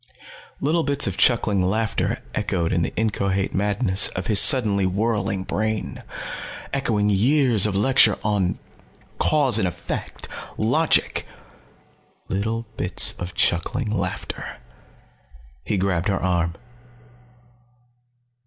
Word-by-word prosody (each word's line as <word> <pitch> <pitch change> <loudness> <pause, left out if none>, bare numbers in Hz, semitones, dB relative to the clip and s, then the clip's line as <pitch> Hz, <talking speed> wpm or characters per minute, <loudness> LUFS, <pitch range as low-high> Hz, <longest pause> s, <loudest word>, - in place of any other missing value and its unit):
Little 160 +4 +1
bits 145 -2 +1
of 95 - -2
chuckling 105 -2 +2
laughter 110 +4 -1
echoed 85 -3 -1
in 85 - +1
the - - -1
inchoate 100 -3 -1
madness 100 0 +2
of 90 - -5
his 105 -1 +3
suddenly 105 -8 +4
whirling 100 0 -1
brain. 110 +2 -3 0.7
Echoing 110 -7 +1
years 120 0 +4
of 100 - -3
lecture 110 +1 +4
on 100 -4 0 0.6
cause 140 -6 +3
and 95 - +1
effect, 90 - -6 0.3
logic. 130 +9 +1 1.0
Little 110 +4 -2
bits - - +2
of 90 0 -6
chuckling 105 +6 0
laughter. 110 - -4 1.1
He 105 - -1
grabbed 90 -2 0
her 95 - +1
arm. 85 -2 0
105 Hz, 105 wpm, -23 LUFS, 95-115 Hz, 1.1 s, suddenly